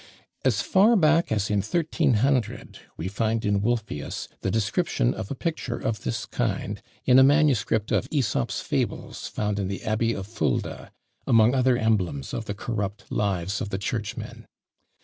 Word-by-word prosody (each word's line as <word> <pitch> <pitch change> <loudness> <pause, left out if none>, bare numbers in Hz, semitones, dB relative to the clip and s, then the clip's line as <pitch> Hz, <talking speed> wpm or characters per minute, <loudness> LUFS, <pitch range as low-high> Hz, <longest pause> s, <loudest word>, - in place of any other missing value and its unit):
As 110 -6 +2
far 210 +5 +5
back 165 - +3
as 105 -1 0
in 105 - +2
1300, 130 - 0 0.2
we 85 - -3
find 110 +3 -1
in 100 -1 +2
Wolfius 110 -9 -2
the - - -2
description 120 - +1
of 110 -3 -6
a - - -3
picture 135 -5 -3
of 110 -1 -2
this 115 - -3
kind, - - -2 0.2
in 125 +1 +7
a - - +8
MS. 140 -4 +4
of 110 +4 0
Æsop's 135 -9 0
Fables - - -3
found 105 -1 -2
in 100 - -1
the 100 0 -5
Abbey 115 +1 +1
of 95 - -5
Fulda, 110 +2 -2 0.4
among 115 +1 +5
other 130 -2 +3
emblems 95 - 0
of 115 - -3
the 100 - -4
corrupt 105 -2 -4
lives 100 -1 -1
of 105 - -3
the 95 - -2
churchmen. 105 +1 -5
110 Hz, 160 wpm, -25 LUFS, 100-130 Hz, 0.4 s, a